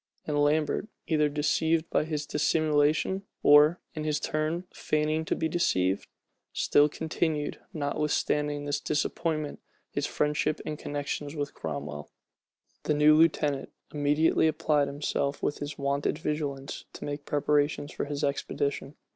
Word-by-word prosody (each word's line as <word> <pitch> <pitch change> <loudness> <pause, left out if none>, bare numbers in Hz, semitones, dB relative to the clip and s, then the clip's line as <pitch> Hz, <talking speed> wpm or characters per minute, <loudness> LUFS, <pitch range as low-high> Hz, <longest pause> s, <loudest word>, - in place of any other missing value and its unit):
And 145 -1 +1
Lambert, 150 +6 +1 0.2
either 150 -2 +2
deceived 160 +2 +1
by - - +2
his 150 -2 -3
dissimulation, 155 +4 +2 0.2
or, 150 +4 +7
in 155 - -4
his 150 -1 0
turn, 155 +3 -1
feigning 155 +1 0
to - - 0
be 160 - 0
deceived, 95 - +1 0.5
still 145 +1 +4
continued, 155 -1 -2
notwithstanding 150 0 -1
this 145 0 -1
disappointment 155 +1 -1 0.3
his - - -1
friendship 150 +1 0
and 150 -1 -4
connections 145 +1 -4
with 145 -2 -3
Cromwell. 75 -1 -5 0.8
The 150 - +2
new 150 +1 +6
lieutenant 150 -3 +2 0.2
immediately 150 +2 +3
applied 150 -2 +2
himself 140 0 -2
with 145 - -1
his 145 0 -5
wonted 140 +1 0
vigilance 145 -3 -3
to - - -7
make 145 0 -4
preparations 145 0 +1
for - - -3
his 145 0 -4
expedition. 140 0 -2
150 Hz, 130 wpm, -28 LUFS, 145-155 Hz, 0.8 s, or